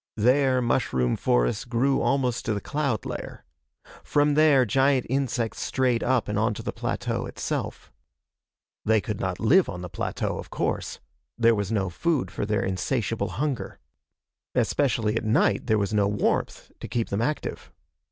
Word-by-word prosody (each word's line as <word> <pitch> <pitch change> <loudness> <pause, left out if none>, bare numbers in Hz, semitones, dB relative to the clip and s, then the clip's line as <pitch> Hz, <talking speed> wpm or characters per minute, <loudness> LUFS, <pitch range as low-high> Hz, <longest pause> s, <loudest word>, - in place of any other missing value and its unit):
There, 130 +3 +3
mushroom 65 - +1
forests - - +1
grew 125 +3 +1
almost 130 -3 +1
to 110 -4 0
the - - -1
cloud 140 -2 -2
layer. - - -6 0.6
From 145 0 +2
there, 145 -4 +5
giant 135 +3 +2
insects 125 -4 -1
strayed 125 -3 +1
up 130 -3 +1
and 105 0 -1
onto 110 -1 0
the - - -3
plateau - - -2
itself. - - -4 0.9
They 110 0 +3
could 105 -1 -4
not 95 -1 -2
live 170 +12 +4
on 90 -1 -6
the 90 - -6
plateau, - - -3
of - - -8
course. - - -2 0.4
There 115 -1 +5
was 100 -1 -2
no 95 -4 0
food 135 - 0
for 100 - -3
their 105 -1 0
insatiable 110 +4 -1
hunger. 130 -7 -3 0.8
Especially 115 -6 +1
at 115 - -1
night, 110 +1 +2
there 110 - +3
was 100 0 -1
no 105 -1 +3
warmth 105 0 -1
to - - -6
keep 115 -2 -2
them 100 +2 -1
active. 150 +6 -3
115 Hz, 160 wpm, -26 LUFS, 105-135 Hz, 0.9 s, there